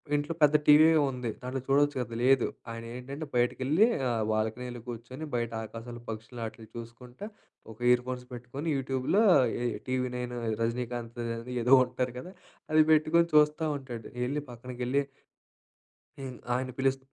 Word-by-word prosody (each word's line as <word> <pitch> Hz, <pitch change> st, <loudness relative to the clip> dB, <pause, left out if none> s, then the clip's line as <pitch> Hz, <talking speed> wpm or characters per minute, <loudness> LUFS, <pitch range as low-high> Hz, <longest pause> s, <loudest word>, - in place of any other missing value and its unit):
ఇంట్లో 145 Hz, +2 st, -1 dB
పెద్ద 150 Hz, 0 st, +6 dB
టీవీయే 155 Hz, +2 st, +7 dB
ఉంది. 125 Hz, -2 st, -4 dB
దాంట్లో 130 Hz, +1 st, -3 dB
చూడొచ్చు 145 Hz, +2 st, +3 dB
కదా! 120 Hz, -2 st, -4 dB
లేదు. 130 Hz, 0 st, +4 dB, 0.3 s
ఆయన 115 Hz, 0 st, -6 dB
ఏంటంటే 135 Hz, +5 st, -6 dB
బయటకెళ్ళి 130 Hz, -, +3 dB, 0.2 s
ఆ -, -, +1 dB, 0.2 s
బాల్కనీలో 115 Hz, +3 st, -2 dB
కూర్చొని 120 Hz, +5 st, -7 dB
బయట 115 Hz, -1 st, -1 dB
ఆకాశాలు, 115 Hz, +2 st, -8 dB
పక్షులు 110 Hz, +2 st, -7 dB
ఆటిని 110 Hz, 0 st, -9 dB
చూసుకుంటా 120 Hz, -, -9 dB, 0.5 s
ఒక 110 Hz, -, -13 dB
ఇయర్ 125 Hz, 0 st, +5 dB
ఫోన్స్ 125 Hz, -1 st, -4 dB
పెట్టుకొని 125 Hz, +6 st, -6 dB
యూట్యూబ్‌లోయే 135 Hz, -, +3 dB
ఈ -, -, -4 dB
'టీవీ 130 Hz, 0 st, 0 dB
నైన్' 125 Hz, 0 st, -4 dB, 0.2 s
ఈ -, -, 0 dB
'రజనీకాంత్‌దని' 115 Hz, 0 st, -3 dB
ఏదో 125 Hz, +3 st, +5 dB
ఉంటారు 125 Hz, 0 st, -3 dB
కదా! 180 Hz, +8 st, -9 dB, 0.4 s
అది 155 Hz, 0 st, +6 dB
పెట్టుకొని 155 Hz, +2 st, +4 dB
చూస్తా 150 Hz, +1 st, +4 dB
ఉంటాడు. 125 Hz, -5 st, -8 dB, 0.2 s
ఎళ్ళి 145 Hz, +4 st, -2 dB
పక్కనకెళ్ళి 125 Hz, +3 st, -2 dB, 1.2 s
హ్మ్. 130 Hz, -2 st, -6 dB, 0.2 s
ఆయన్ని 130 Hz, +1 st, -1 dB
పిలుస్ 135 Hz, 0 st, +2 dB
125 Hz, 145 wpm, -29 LUFS, 120-140 Hz, 1.2 s, టీవీయే